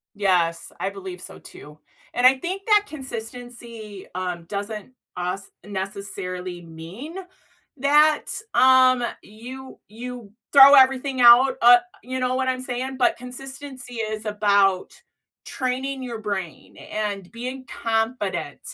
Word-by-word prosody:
Yes, 180 -4 0
I 195 - -2
believe 190 -2 -8
so - - -10
too. 150 +1 -13 0.4
And 245 +1 +4
I 265 +1 +6
think 375 +6 -4
that 420 -1 +5
consistency, 235 -5 -8
um, 180 -2 -4
doesn't, 205 +5 -6 0.2
us, 180 +2 -4
necessarily 190 -3 -5
mean 170 - -10 0.6
that, 295 +3 +4 0.3
um, 255 -1 +5 0.2
you 255 +5 -11
you 235 -1 -9 0.2
throw 280 0 +10
everything 265 0 +4
out, 245 +3 +7
uh, 245 +1 +9 0.3
you 255 +1 -4
know 255 0 0
what 260 0 0
I'm 255 0 -1
saying? 255 +1 -4
But 250 - +3
consistency 260 0 -9
is 215 -1 -4
about 200 -2 +2 0.5
training 260 +1 -3
your 235 -3 -5
brain 195 -6 -5
and 205 -3 -5
being 255 +3 -6
confident 225 - -2
235 Hz, 120 wpm, -23 LUFS, 200-260 Hz, 0.6 s, throw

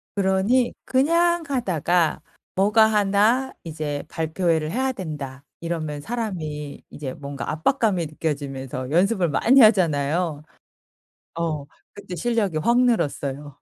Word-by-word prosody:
그러니 200 +6 +2
그냥 335 +6 +2
하다가 175 - +1 0.3
뭐가 210 +3 +5
1 215 +5 +2
'이제 155 -3 -4
발표회를 160 -1 0
해야 260 +3 0
된다.' 150 - -7 0.2
이러면 155 -3 -3
사람이 155 -10 -5
이제 135 -3 -6
뭔가 140 -1 -6
압박감이 185 - +1
느껴지면서 135 -4 -4
연습을 185 +1 +2
많이 245 - +5
하잖아요. 165 -6 +3 0.9
어. 160 -3 -2 0.3
그때 190 -3 -8
실력이 210 -3 0
확 235 +9 +3
늘었어요. 145 - -1
170 Hz, 260 characters per minute, -23 LUFS, 150-220 Hz, 0.9 s, 뭐가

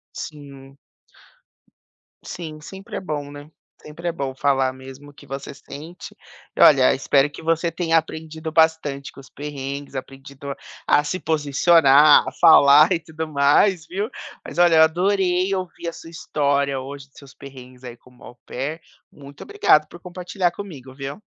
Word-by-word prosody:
Sim. 140 -2 -10 1.5
Sim, 155 -3 -8
sempre 195 +5 -10
é - - -3
bom, 145 -5 -5
né, 145 +1 -11 0.3
sempre 165 +3 -8
é 170 - +1
bom 135 -5 -5
falar 135 -2 +1
mesmo 135 +2 -12
o - - -17
que 145 - -17
você 135 +1 -7
sente. 155 +5 -11 0.4
E - - -2
olha, 135 -4 +6
espero 135 +1 +2
que - - -11
você 165 +1 0
tenha 165 -2 +1
aprendido 160 0 -5
bastante 160 -4 +1
com - - -15
os 135 - -15
perrengues, 140 -1 -7
aprendido 135 +1 -8 0.3
a 145 - +3
se 150 +5 -3
posicionar, 150 -1 +4
a - - -3
falar 155 0 +7
e 165 - 0
tudo 160 0 -7
mais, 155 +4 +2
viu? 200 +4 -3 0.4
Mas 145 - -9
olha 175 -2 +5
eu 160 - +7
adorei 185 +2 +1
ouvir 180 -2 -6
a 170 - -4
sua 165 - -12
história 140 -4 -1
hoje, 140 +1 -9
seus 140 -2 -16
perrengues 130 -2 -13
aí 120 -1 -9
como 125 +1 -21
au - - -12
pair 145 +6 -5 0.3
muito 140 -1 -14
obrigado 155 - +2
por 175 - -14
compartilhar 180 0 -3
comigo 145 -10 -10
viu? 140 +7 -8
150 Hz, 160 wpm, -21 LUFS, 140-165 Hz, 1.5 s, falar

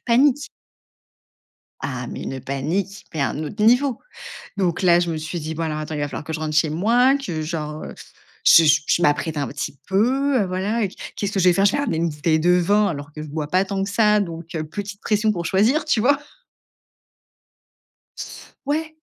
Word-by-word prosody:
Panique. 270 +4 +3 1.3
Ah 125 -3 -4
mais - - -6
une 135 -1 -5
panique 170 +10 -3
mais 155 - -2
un 140 0 -1
autre 205 +8 -4
niveau. 245 +2 +3 0.6
Donc 180 -2 0
là, 175 -1 +6
je 175 -1 -1
me 160 - -2
suis 160 +3 -4
dit: 160 0 -5
«Bon, 165 - -2
alors, 155 -1 -2
attends, 155 0 -5
il 150 - -3
va 145 - -1
falloir 145 - -6
que 160 +2 -6
je 160 - -3
rentre 155 -1 -3
chez 155 0 +3
moi, 235 - +3
que 180 - -3
genre, 155 -1 -4
heu, - - -8 0.5
je 165 - +8
je 150 +2 +3
m'apprête 150 0 +1
un 140 - -1
petit 145 0 -5
peu, 255 +8 +2
heu, - - +1
voilà. 195 +4 -1
Qu - - -14 0.2
qu'est-ce 200 -1 -2
que 200 - -1
je 185 - +2
vais - - +4
faire?» 195 +3 +2
je 200 - +5
vais - - -1
ramener 280 - -1
une 170 +1 +1
bouteille 155 +2 0
de 175 +3 +3
vin 200 +4 +3
alors 145 -3 -5
que 150 0 -7
je 155 - -8
bois 150 0 -4
pas 185 +5 +2
tant 195 0 -2
que 195 - -3
ça, 210 0 +3
donc 170 -3 -5
heu, 155 - -2
petite 200 +5 -7
pression 215 0 +1
pour 175 -4 -4
choisir, 220 - +2
tu 275 -8 +2
vois? 280 +5 +3 2.5
Ouais. 315 +2 -2
180 Hz, 210 wpm, -22 LUFS, 155-210 Hz, 2.5 s, je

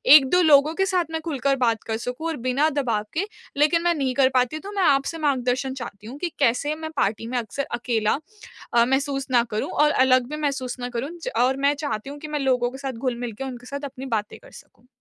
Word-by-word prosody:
1-2 305 +5 +6
लोगों 305 -1 +5
के 385 +2 +2
साथ 365 -3 +1
मैं 320 - -2
खुलकर 280 -4 0
बात 230 -2 0
कर 220 0 -1
सकूँ 250 +7 -4
और 325 -2 -2
बिना 280 +5 +3
दबाव 240 -8 -1
के। 360 +5 0 0.3
लेकिन 305 +3 +4
मैं 345 0 +3
नहीं 270 -4 0
कर 265 -1 +4
पाती 255 +4 +1
तो 395 +6 -8
मैं 400 -2 0
आपसे 280 +1 +2
मार्गदर्शन 260 -3 0
चाहती 215 -5 -8
हूँ 260 +5 -8
कि 350 +1 -2
कैसे 280 +3 +2
मैं 315 0 -6
पार्टी 215 +2 0
में 245 +1 -2
अक्सर 240 +4 -3
अकेला 225 -1 +1 0.6
अ, 235 0 +5
महसूस 270 +1 0
ना 240 -2 +5
करूँ? 215 - -2
और 300 0 +3
अलग 255 -1 +4
भी 300 - -4
महसूस 270 -4 -2
ना 245 - -4
करूँ 270 +5 -2 0.3
और 265 +1 +2
मैं 280 +1 +3
चाहती 280 -5 -4
हूँ 290 +1 -8
कि 305 - -7
मैं 300 -1 -2
लोगों 250 -3 +1
के 265 - -8
साथ 270 -1 -4
घुल-मिल 240 0 -3
के 250 +6 -6
उनके 250 -2 -7
साथ 280 +1 -5
अपनी 265 +1 -8
बातें 210 0 -6
कर - - -17
सकूँ। 245 - -17
270 Hz, 230 wpm, -24 LUFS, 245-300 Hz, 0.6 s, 1-2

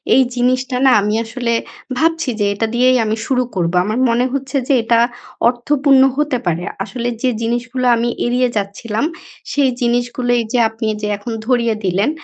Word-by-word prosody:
এই 265 - +6
জিনিসটা 255 +1 0
না 265 - +6
আমি 210 +1 -1
আসলে 235 +1 -2 0.4
ভাবছি 325 0 +1
যে 205 - +2
এটা 225 +3 -1
দিয়েই 255 +1 +4
আমি 215 +1 -1
শুরু 255 -2 +1
করবো। 175 -1 0
আমার 215 +4 -1
মনে 235 +2 +2
হচ্ছে 275 +1 -2
যে 280 - +3
এটা 230 0 +3 0.5
অর্থপূর্ণ 270 +2 +2 0.2
হতে 295 -3 +1
পারে। 175 0 -1 0.2
আসলে 240 +3 -4
যে 255 - +2
জিনিসগুলো 240 +2 -2
আমি 235 +1 0 0.2
এড়িয়ে 250 +1 +1
যাচ্ছিলাম 210 +5 -2 0.5
সেই 280 -2 +2
জিনিসগুলোই 245 0 +1
যে 250 - +3
আপনি 225 0 -4
যে 210 - -2
এখন 205 +4 -7
ধরিয়ে 235 -2 +1
দিলেন 195 +6 +1
245 Hz, 165 wpm, -17 LUFS, 225-255 Hz, 0.5 s, এই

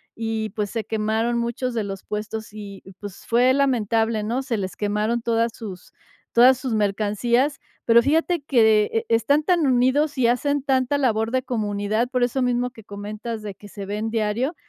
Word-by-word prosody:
y, 225 -1 -2
pues, 205 -1 -3
se 225 -2 -2
quemaron 220 +3 -1
muchos 235 +1 -2
de 225 -2 -1
los 195 -1 -6
puestos 215 +1 -5
y, 200 -2 -9 0.2
pues, 205 -2 -9
fue 245 +2 +3
lamentable, 225 -5 +1
¿no? 235 +5 -1
Se 245 -4 -2
les 190 -2 -4
quemaron 210 +3 -1
todas 230 0 +1
sus 190 -5 -9 0.4
todas 250 +2 +6
sus 255 -2 -3
mercancías, 215 +6 +1 0.2
pero 235 0 +6
fíjate 320 +5 +1
que 220 -6 +3
e 225 +1 0
están 255 +7 +3
tan 340 -4 +2
unidos 260 +4 +2
y 245 - +3
hacen 285 +4 +1
tanta 265 0 +1
labor 225 -4 +1
de 255 +1 0
comunidad, 215 0 -1
por 250 -2 0
eso 250 +2 0
mismo 250 0 +1
que 225 -4 -15
comentas 210 +3 -6
de 210 -2 -6
que 205 +2 -14
se 200 -1 -8
ven 210 +3 -3
diario, 230 +8 -1
230 Hz, 180 wpm, -23 LUFS, 210-255 Hz, 0.4 s, todas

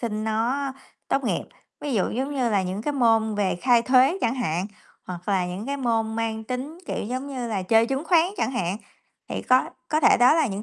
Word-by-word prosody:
sinh 215 -2 -3
nó 245 +6 -1 0.4
tốt 275 -1 0
nghiệp. - - 0 0.4
Ví 285 -4 -3
dụ 195 - +1
giống 270 +5 -3
như 250 -4 0
là 200 -3 +2
những 185 +3 -4
cái 295 - -1
môn 225 -4 +2
về 200 -3 0
khai 245 -2 +4
thuế 260 +8 +4
chẳng 235 +2 +1
hạn, 185 -6 -1 0.4
hoặc 180 +1 -7
là 185 -3 +1
những 185 +6 -5
cái 280 0 -2
môn 225 -3 -1
mang 220 -1 -2
tính, 260 +7 -5
kiểu, - - -3
giống 255 +5 -4
như 250 -4 -4
là 200 -4 -2
chơi 225 +4 +4
chứng 270 +4 -2
khoán 335 -1 +4
chẳng 275 - 0
hạn. 195 -6 -2 0.5
Thì - - -4
có 255 +1 +4 0.2
có 310 - +1
thể - - +6
đó 245 +5 +6
là 320 -3 +3
những 205 -2 -4
235 Hz, 225 wpm, -24 LUFS, 215-270 Hz, 0.5 s, thể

